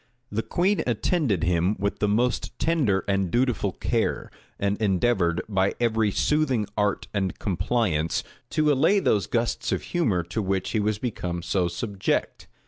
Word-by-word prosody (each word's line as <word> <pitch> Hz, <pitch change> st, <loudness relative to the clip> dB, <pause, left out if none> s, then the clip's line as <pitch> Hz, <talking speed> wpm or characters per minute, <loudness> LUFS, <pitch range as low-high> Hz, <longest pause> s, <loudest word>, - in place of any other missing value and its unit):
The 110 Hz, -, 0 dB
queen 190 Hz, -, +1 dB
attended 120 Hz, -, +1 dB
him 90 Hz, +4 st, +2 dB
with 100 Hz, +1 st, -2 dB
the 105 Hz, -, +2 dB
most 120 Hz, +4 st, 0 dB
tender 140 Hz, -13 st, +1 dB
and 100 Hz, -2 st, +1 dB
dutiful 120 Hz, -4 st, +1 dB
care, -, -, -1 dB, 0.3 s
and 100 Hz, 0 st, 0 dB
endeavored, 95 Hz, -4 st, +2 dB
by 95 Hz, -2 st, +1 dB
every 110 Hz, -2 st, +2 dB
soothing 135 Hz, -1 st, +1 dB
art 105 Hz, -1 st, 0 dB
and 95 Hz, -3 st, -1 dB
compliance, 90 Hz, -5 st, 0 dB, 0.3 s
to 155 Hz, -1 st, +2 dB
allay 160 Hz, +9 st, +4 dB
those 105 Hz, -, +1 dB
gusts 115 Hz, -1 st, -1 dB
of -, -, -1 dB
humor 110 Hz, -, 0 dB
to 100 Hz, +7 st, -3 dB
which 95 Hz, -1 st, -1 dB
he 110 Hz, -, +1 dB
was 105 Hz, 0 st, 0 dB
become 90 Hz, -7 st, -4 dB
so 90 Hz, -1 st, +1 dB
subject. 100 Hz, +3 st, -2 dB
105 Hz, 150 wpm, -25 LUFS, 95-120 Hz, 0.3 s, allay